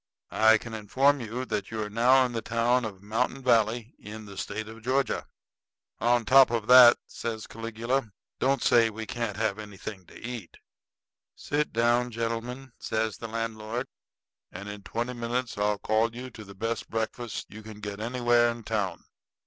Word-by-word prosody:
I 110 0 +6
can 115 +1 -9
inform 130 +6 +2
you 120 +3 -4
that 105 - -3
you 110 -1 -3
are - - -4
now 125 +5 +4
in 125 - -3
the 115 -1 -3
town 115 +2 +1
of 100 -3 -7
Mountain 125 +5 -1
Valley, 115 -1 +2
in 110 +1 -9
the 100 -1 -10
State 105 +3 -4
of 110 +1 -10
Georgia." 130 +2 0 0.7
"On 120 -1 +2
top 135 +4 +7
of 115 -2 -1
that," 125 0 +9
says 110 -2 -5
Caligula, 115 +2 -2 0.3
"don't 135 -1 +1
say 115 -1 +5
that 110 - -2
we 110 +1 -5
can't 115 -3 -3
have 110 -2 0
anything 105 -2 -8
to - - -13
eat." 115 -6 -7 0.8
"Sit 150 +1 -1
down, 120 +2 +2
gentlemen," 115 +3 -4
says 110 -1 -2
the 115 - -5
landlord, 115 +1 -3 0.7
"and 100 +3 -8
in 105 0 -7
twenty 120 +5 -3
minutes 120 +1 -2
I'll 105 0 +1
call 110 +3 +1
you 125 +1 -7
to 110 - -10
the 100 -1 -12
best 115 +4 -3
breakfast 115 0 -4
you 110 +2 -9
can 110 -1 -10
get 105 -1 -6
anywhere 120 +1 +3
in 115 0 -5
town." 100 -6 -2
115 Hz, 175 wpm, -28 LUFS, 110-120 Hz, 0.8 s, that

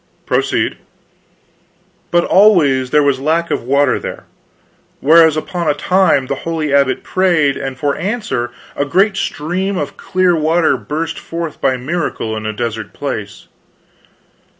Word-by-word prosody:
"Proceed." - - 0 1.3
"But 175 0 +3
always 155 -11 +4
there 150 +1 +3
was 140 -2 +1
lack 160 +4 0
of - - 0
water 140 +4 +2
there. - - -7 0.8
Whereas, 160 +1 +5
upon 170 +1 -2
a 145 - +2
time, 185 -7 +2
the 135 - -2
holy 160 -3 -2
abbot 140 -2 +2
prayed, 170 -7 +2
and 135 -1 -5
for 140 +1 -1
answer 195 - -2 0.3
a - - 0
great 190 +8 +2
stream 185 +5 -2
of 145 - -4
clear 185 -2 +1
water 160 +1 +2
burst 160 +2 -4
forth 165 -2 -6
by 130 -1 +1
miracle 130 -5 -3
in 110 0 -4
a - - -1
desert 110 -1 -4
place. - - -6
155 Hz, 140 wpm, -16 LUFS, 135-175 Hz, 1.3 s, Whereas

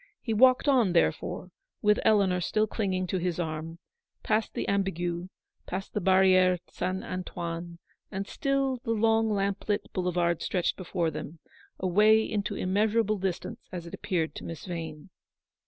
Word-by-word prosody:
He 225 - -2
walked 255 +5 +5
on, 245 -10 +4
therefore, 80 -1 0 0.3
with 210 0 +4
Eleanor 195 -4 +3
still 215 +5 +1
cliuging 185 -5 -1
to 185 - 0
his 180 -1 -2
arm; 160 0 -4 0.5
past 215 0 0
the - - -2
Ambigu, 175 -3 -1
be - - -28 0.4
yond 190 +1 -3
the - - -1
Barriere 185 -1 +5
St. 185 +1 -2
Antoine; 170 -2 -5 0.3
and 195 +1 -3
still 275 +2 0
the 230 -1 -2
long 225 0 +3
lamp 200 0 -1
lit 205 - -1
boulevard 175 -2 0
stretched 180 -3 0
before 175 -3 -2
them, 155 +2 -7 0.4
away 210 +4 +5
86 - - -4
into 205 -1 -1
immeasurable 210 +3 +1
distance, 195 +5 -4
as 175 -3 -6
it 170 - -10
appeared 170 -6 -1
to - - -8
Miss 165 -2 -7
Vane. 165 -2 -6
190 Hz, 155 wpm, -28 LUFS, 175-215 Hz, 0.5 s, walked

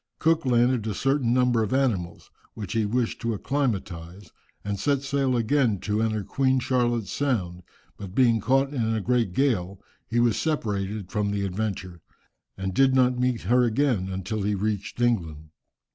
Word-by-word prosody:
Cook 160 -3 +1
landed 120 -2 +2
a 105 - -2
certain 135 -1 +1
number 125 -2 +3
of 110 +4 0
animals, 105 -11 -1 0.2
which 105 -3 -6
he 110 -2 +1
wished 120 +2 -1
to 115 -1 -1
acclimatize, 100 - -3 0.3
and 100 -1 -3
set 140 +3 0
sail 135 -2 0
again 115 -2 +2
to 105 +1 -1
enter 110 -2 0
Queen 130 +5 +1
Charlotte's 120 -4 0
Sound, 95 -11 -1 0.4
but 95 -1 -9
being 120 -3 +4
caught 135 +4 +2
in 115 -4 0
a - - 0
great 115 -2 +1
gale, 100 -6 0 0.3
he 120 - 0
was 120 -2 +2
separated 105 - -2
from 105 0 0
the 100 -1 -1
Adventure, 95 -3 -4 0.6
and 95 -1 -3
did 135 +4 +4
not 125 -1 +3
meet 125 -2 0
her 120 +7 +3
again 120 -5 +1
until 95 +3 -3
he 105 +1 0
reached 105 +2 -3
England. 80 -11 -1
115 Hz, 165 wpm, -25 LUFS, 100-125 Hz, 0.6 s, being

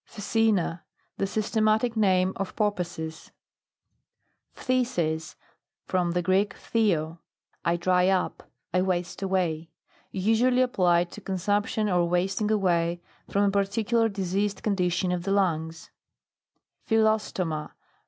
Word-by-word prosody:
PHCECENA. 205 -5 0 0.4
The 195 - +1
systematic 220 +2 +1
name 190 -3 +3
of 195 - -4
porpoises. 170 -6 -3 1.2
PHTHISIS. 175 -12 -1 0.5
From 175 -2 0
the 175 0 0
Greek, 190 +3 +1
phthed, 170 -8 0 0.4
I 170 0 +1
dry 180 +1 +2
up, 190 -1 -1 0.2
I 180 - +3
waste 180 -1 -2
away. 175 -4 -1 0.4
Usually 225 +7 +2
ap 250 0 -3
plied 175 -1 +2
to 210 - -10
consumption, 205 +3 -1
or 175 -3 +2
wasting 190 +4 0
away, 175 -5 +1 0.3
from 200 - +1
a 200 - +3
particular 215 +3 +1
diseased 200 +1 -2
condition 180 -3 0
of 180 -1 -1
the 195 +3 -3
lungs 165 -4 -1 1.0
PHYLLOSTOMA. 215 -8 0
190 Hz, 115 wpm, -26 LUFS, 175-210 Hz, 1.2 s, name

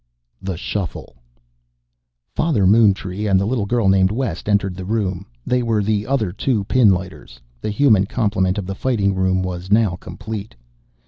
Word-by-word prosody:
THE 95 -3 -4
SHUFFLE 90 - -5 1.2
Father 140 - +1
Moontree 100 -1 +3
and 95 -1 +4
the 100 - 0
little 110 -2 -1
girl 120 -2 +1
named 95 -1 +4
West 105 -5 -3
entered 100 -3 +1
the 95 - -7
room. 95 -2 -2 0.2
They 125 0 +1
were 115 -3 0
the 105 0 -1
other 120 -8 0
two 105 +2 -1
pinlighters. 95 - 0 0.2
The - - -3
human 105 -3 +3
complement 95 -4 0
of 100 - -3
the 95 - -4
Fighting 100 -3 0
Room 95 0 +1
was 90 0 -5
now 105 -4 +3
complete. 105 +2 -7
100 Hz, 155 wpm, -20 LUFS, 95-110 Hz, 1.2 s, and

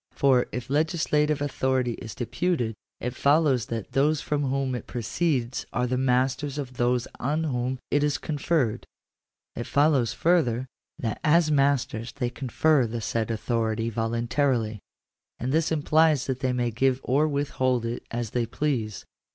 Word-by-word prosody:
For, 130 -3 +3
if 125 -1 -5
legislative 150 0 +1
authority 130 -3 0
is 110 - -7
deputed, 120 0 -1 0.3
it 125 0 -3
follows 140 -4 +3
that 115 -3 -5
those 145 +2 +2
from 145 -1 -1
whom 135 0 -1
it 125 - -5
proceeds 125 +1 -1
are 125 +1 0
the 125 +1 -1
masters 130 +2 +1
of 130 -3 -5
those 120 0 +1
on 150 +5 0
whom 130 -3 -1
it 145 0 +3
is 150 -1 +1
conferred: 150 -6 -1 0.7
it 120 - -5
follows 140 -5 +3
further, 130 -9 +2 0.3
that 110 -3 -3
as 155 0 +4
masters 135 -5 +1
they 125 -3 -2
confer 135 +1 +2
the 115 +1 -4
said 115 0 -2
authority 115 0 -1
voluntarily: 115 0 0 0.6
and 125 +2 -2
this 160 +2 +1
implies 155 -2 +3
that 130 -1 -2
they 130 -1 0
may 120 -1 0
give 130 +3 +1
or 145 +5 +2
withhold 130 -4 0
it 115 +1 -3
as 120 -2 -3
they 120 -2 0
please. 115 -6 -2
130 Hz, 150 wpm, -26 LUFS, 120-145 Hz, 0.7 s, as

